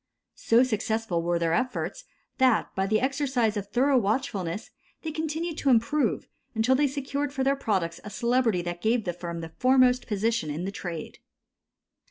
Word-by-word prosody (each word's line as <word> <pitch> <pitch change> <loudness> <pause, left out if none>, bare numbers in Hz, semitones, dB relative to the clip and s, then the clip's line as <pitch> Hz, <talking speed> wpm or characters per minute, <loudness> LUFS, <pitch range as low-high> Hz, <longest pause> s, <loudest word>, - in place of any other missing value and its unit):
So 230 +2 +5
successful 220 -6 -1
were 170 +1 0
their 165 -1 0
efforts 255 - -2 0.3
that, 255 -3 +3
by 190 0 0
the 215 +1 +2
exercise 260 -4 0
of 200 -1 -3
thorough 255 +5 +3
watchfulness, 205 -5 -2 0.3
they 320 - -3
continued 320 +1 -3
to 280 - +1
improve, 255 +5 +2 0.3
until 225 +4 +3
they 285 +2 +3
secured 280 +1 -3
for 270 -2 -1
their 275 +1 +3
products 190 -10 -1
a 210 - -7
celebrity 235 -4 +1
that 175 0 -5
gave 225 +1 +2
the 175 - -2
firm 170 -1 -6
the 165 - -6
foremost 255 -1 +4
position 220 -3 0
in 155 +5 -3
the 195 - -3
trade. 175 -5 -6
230 Hz, 170 wpm, -27 LUFS, 190-265 Hz, 0.3 s, So